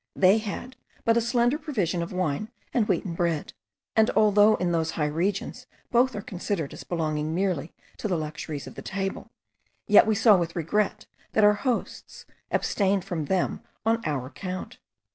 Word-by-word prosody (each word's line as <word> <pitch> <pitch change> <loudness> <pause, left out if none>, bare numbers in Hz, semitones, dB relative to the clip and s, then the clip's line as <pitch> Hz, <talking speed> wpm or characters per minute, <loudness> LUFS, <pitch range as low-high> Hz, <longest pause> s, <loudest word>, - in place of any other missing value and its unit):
They 195 +3 +5
had 230 +4 -6 0.3
but 230 - +4
a 235 - +3
slender 240 +4 +2
provision 200 - -1
of 170 - -4
wine 185 +3 -1 0.2
and 225 -4 +2
wheaten 185 -2 0
bread; 165 -3 -1 0.4
and 220 0 +5
although 210 0 +5
in 180 -1 -1
those 165 -1 0
high 150 - +1
regions 195 +10 -2 0.2
both 250 +2 +3
are 205 - -4
considered 180 -6 -3
as - - -9
belonging 155 -2 -2
merely 180 -4 -1 0.3
to - - -3
the 180 -4 0
luxuries 155 -1 -5
of - - -9
the - - -8
table, 195 0 -4 0.6
yet 210 +1 +7
we 220 - +3
saw 220 0 +6
with 170 -1 -2
regret, 190 +5 0 0.3
that 220 - +3
our 210 0 +7
hosts 245 +3 -3 0.2
abstained 195 -2 +1
from 170 -6 -3
them 185 +3 0 0.2
on 225 +1 +2
our 145 -5 -2
account. 185 +7 -6
195 Hz, 170 wpm, -26 LUFS, 165-215 Hz, 0.6 s, yet